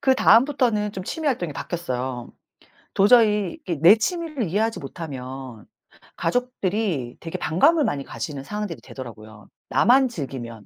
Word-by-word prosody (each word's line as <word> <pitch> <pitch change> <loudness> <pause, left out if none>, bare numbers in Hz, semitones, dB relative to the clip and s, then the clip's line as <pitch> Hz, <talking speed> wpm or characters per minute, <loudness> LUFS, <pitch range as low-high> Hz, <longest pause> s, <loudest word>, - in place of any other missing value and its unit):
그다음부터는 245 -4 +3
좀 190 - -5
취미 315 +9 -4
활동이 180 - 0
바뀌었어요. 130 -7 -4 0.6
도저히 210 -2 +4
이게 170 - -2
내 185 +6 +9
취미를 310 +2 -2
이해하지 220 +5 0
못하면 130 -6 -8 0.5
가족들이 195 - -1
되게 165 - -5
반감을 290 - +3
많이 140 -1 -2
가지는 135 +4 -6
상황들이 205 0 -5
되더라고요, 110 -5 -11 0.2
나만 260 +1 +4
즐기면. 120 - -7
180 Hz, 345 characters per minute, -23 LUFS, -, 0.6 s, 내